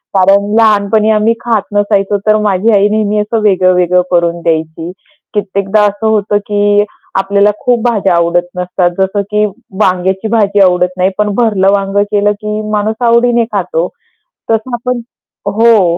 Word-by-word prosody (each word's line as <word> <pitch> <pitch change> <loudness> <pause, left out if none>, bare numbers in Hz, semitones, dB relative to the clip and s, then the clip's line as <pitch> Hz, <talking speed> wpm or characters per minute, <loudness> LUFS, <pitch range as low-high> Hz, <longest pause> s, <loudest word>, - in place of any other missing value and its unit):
कारण 200 +2 +3
लहानपणी 215 0 +2
आम्ही 215 +1 +2
खात 230 -3 0
नसायचो 205 -1 +1
तर 215 0 +4
माझी 210 +2 +1
आई 205 0 +4
नेहमी 210 0 0
असं 215 +2 -1
वेगळं-वेगळं 180 -2 +2
करून 170 -1 0
द्यायची 160 +1 -2 0.4
कित्येकदा 200 0 0
असं 205 +2 -1
होतं, 210 -1 +1
की 205 0 +1 0.4
आपल्याला 200 +1 +2
खूप 245 -2 +1
भाज्या 195 -6 +1
आवडत 170 +1 +1
नसतात. 180 0 -1
जसं 190 +2 0
की 210 0 +2 0.4
वांग्याची 190 +2 0
भाजी 205 -2 +1
आवडत 180 -1 +3
नाही, 185 +1 +2
पण 210 -1 0
भरलं 200 -5 +2
वांगं 200 0 0
केलं 205 0 +2
की 210 0 -3
माणूस 215 +1 -1
आवडीने 235 0 +3
खातो. 180 -3 -1 0.6
तसं 225 +3 -1
आपण 240 0 -3 0.6
हो, 215 -7 +3
205 Hz, 145 wpm, -12 LUFS, 185-215 Hz, 0.6 s, तर